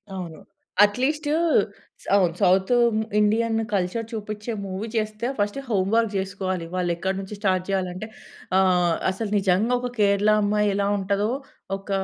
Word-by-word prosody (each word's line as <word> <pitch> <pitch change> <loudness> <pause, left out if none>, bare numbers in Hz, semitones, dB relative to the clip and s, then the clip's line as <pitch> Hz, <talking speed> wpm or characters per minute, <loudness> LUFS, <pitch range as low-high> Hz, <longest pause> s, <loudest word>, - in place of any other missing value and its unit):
అవును. 170 -4 -7 0.4
అట్లీస్ట్ 270 +8 +1 0.8
సౌ 200 - +3 0.2
south 190 +3 +3 0.5
Indian 225 +2 +2 0.2
culture 200 +4 -1
చూపించే 215 +1 -5
మూవీ 195 +4 -4
చేస్తే 215 +1 -2
ఫస్ట్ 205 +6 0
హోమ్ 195 -3 +1
వర్క్ 230 -2 +2
చేసుకోవాలి. 190 -2 -3
వాళ్ళు 180 -1 0
ఎక్కడి 190 +2 -2
నుంచి 195 +2 -7
స్టార్ట్ 185 -3 +1
చేయాలి 190 -2 0
అంటే, 200 +4 -6 0.5
ఆహ్, 180 -3 +3 0.2
అసలు 205 +2 -4
నిజంగా 195 +5 +2
ఒక 250 0 -3
కేరళ 200 +1 +3
అమ్మాయి 210 0 +2
ఎలా 200 0 +1
ఉంటదో 200 +2 0 0.5
ఒక 195 +1 -17
200 Hz, 140 wpm, -24 LUFS, 190-215 Hz, 0.8 s, సౌ